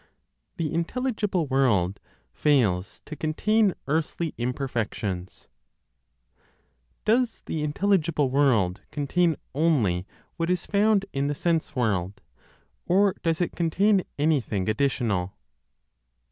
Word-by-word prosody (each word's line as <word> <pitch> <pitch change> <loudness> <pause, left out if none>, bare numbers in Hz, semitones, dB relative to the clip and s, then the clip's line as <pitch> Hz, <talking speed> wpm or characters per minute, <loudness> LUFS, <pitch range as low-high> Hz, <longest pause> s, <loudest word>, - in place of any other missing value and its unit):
THE 160 -2 -2
INTELLIGIBLE 205 0 -1
WORLD 115 -9 +1 0.3
FAILS 110 -11 +1
TO 155 - -7
CONTAIN 200 +6 +1
EARTHLY 160 +2 -1
IMPERFECTIONS. 115 -7 -3 1.6
Does 235 +2 +1
the 155 -2 -3
intelligible 155 -3 +1
world 120 -10 +2
contain 160 +3 +1 0.2
only 120 - +1 0.3
what 165 0 -1
is 180 -1 0
found 205 0 +2
in 140 0 0
the 145 - -1
sense 165 -1 -1
world, 100 -6 -1 0.7
or 195 +2 +4
does 165 0 0
it 175 - 0
contain 190 +4 +2 0.2
anything 140 -11 0
additional?... 110 -6 0
150 Hz, 100 wpm, -26 LUFS, 115-175 Hz, 1.6 s, or